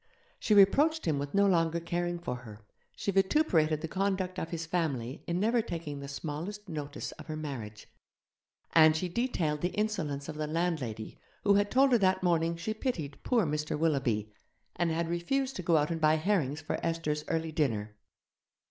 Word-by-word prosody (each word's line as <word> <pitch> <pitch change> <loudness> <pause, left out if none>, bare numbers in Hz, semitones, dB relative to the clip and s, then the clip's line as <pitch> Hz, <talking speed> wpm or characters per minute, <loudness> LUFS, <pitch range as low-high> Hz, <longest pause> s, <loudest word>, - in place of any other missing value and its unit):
She 215 - +2
reproached 290 +12 +5
him 150 -4 +1
with 145 +3 -4
no 200 0 +5
longer 170 -3 +2
caring 175 +1 -2
for 125 -7 -4
her; 110 -4 -12 0.3
she 200 - -2
vituperated 190 - +2
the 165 - -3
conduct 190 0 -1
of 165 - -4
his 165 -1 -4
family 145 -7 -2
in 170 +1 0
never 230 +4 +3
taking 165 -9 -5
the 140 - -7
smallest 160 +9 -5
notice 150 -3 -5
of - - -10
her 155 - -4
marriage; 120 -9 -6 0.9
and 155 -1 +7
she 180 - -1
detailed 175 - -1
the 180 - -1
insolence 175 -10 -2
of 155 -2 -6
the 155 0 -2
landlady 155 -10 -2 0.2
who 200 - +5
had 205 0 +3
told 270 +3 +4
her 240 - +5
that 185 -1 +2
morning 170 -1 +2
she 170 +6 -3
pitied 175 - -3
'poor 235 -6 +2
Mr. 150 0 -2
Willoughby', 135 -10 0 0.4
and 175 - +1
had 165 +1 -1
refused 260 +11 -1
to - - -3
go 170 -2 +3
out 150 +2 +1
and 165 -1 -3
buy 155 0 +5
herrings 160 -4 0
for 150 - -4
Esther's 160 -2 -1
early 160 -1 -1
dinner. 110 -9 -1
165 Hz, 185 wpm, -30 LUFS, 150-190 Hz, 0.9 s, and